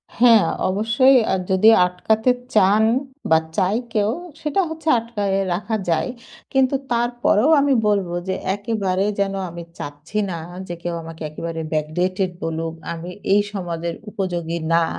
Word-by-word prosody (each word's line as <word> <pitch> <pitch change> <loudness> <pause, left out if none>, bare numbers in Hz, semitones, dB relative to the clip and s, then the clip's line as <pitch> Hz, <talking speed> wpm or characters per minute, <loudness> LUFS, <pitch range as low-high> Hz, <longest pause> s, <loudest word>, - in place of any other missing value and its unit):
হ্যাঁ, 230 -3 +6 0.2
অবশ্যই 230 +7 +4
আর 190 - +1
যদি 190 +4 +6 0.2
আটকাতে 215 +6 0 0.3
চান 205 +2 +5 0.5
বা 160 - +6 0.2
চায় 200 +3 +2
কেউ 210 0 +2 0.3
সেটা 310 +5 +1
হচ্ছে 320 0 -8
আটকায়ে 205 -4 -2
রাখা 210 +5 -2
যায়। 165 +8 +1 0.4
কিন্তু 265 0 +3 0.2
তারপরেও 240 +1 +2
আমি 280 -1 +3
বলব 200 -3 +2 0.2
যে 190 - 0 0.2
একেবারে 200 -3 -1
যেন 195 0 +1 0.2
আমি 170 0 -8
চাচ্ছি 145 +8 -7
না 170 - -3 0.3
যে 175 - -4
কেউ 175 0 -2
আমাকে 165 0 -10
একেবারে 165 +1 -5
backdated 180 +5 -1
বলুক, 165 0 -3 0.2
আমি 170 +2 -7 0.2
এই 205 - +5
সমাজের 170 -3 -4
উপযোগী 175 -5 -3 0.2
না, 170 0 +4
195 Hz, 140 wpm, -21 LUFS, 170-225 Hz, 0.5 s, হ্যাঁ